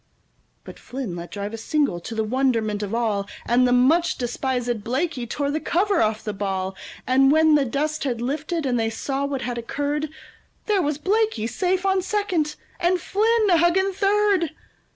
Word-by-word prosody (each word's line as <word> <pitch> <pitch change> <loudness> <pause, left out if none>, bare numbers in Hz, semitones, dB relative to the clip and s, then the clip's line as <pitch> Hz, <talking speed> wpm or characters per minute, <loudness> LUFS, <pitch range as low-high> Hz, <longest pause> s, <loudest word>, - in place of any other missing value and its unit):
But - - -11
Flynn 250 -9 -5
let 175 0 -7
drive 205 +1 -5
a - - -4
single 275 - 0
to 225 +6 -7
the 220 - 0
wonderment 225 -3 0
of 205 +2 -3
all, 210 -4 0 0.2
And 250 +1 +3
the - - +1
much 285 +8 +3
despisèd 245 -2 -2
Blaikie 250 +1 -2
tore 285 +1 -1
the 310 - -1
cover 390 +4 +1
off 220 0 0
the 210 - -3
ball; 190 -1 -3 0.3
And 270 +1 +4
when 315 0 +5
the 290 -2 +4
dust 300 +5 -2
had 250 -5 -1
lifted, 300 +6 -2
and 245 -2 +1
they 225 0 +1
saw 270 +5 -2
what 275 -2 -3
had 240 -1 -3
occurred, 290 +5 -2 0.6
There 415 -3 +2
was 295 -3 -1
Blaikie 390 - 0
safe 370 +7 -1
on 385 -1 +2
second 365 -6 -1 0.2
and 355 +1 +2
Flynn 430 +3 +2
a 345 - +6
hugging 375 +4 +3
third! 395 -4 +2
275 Hz, 180 wpm, -23 LUFS, 230-345 Hz, 0.6 s, a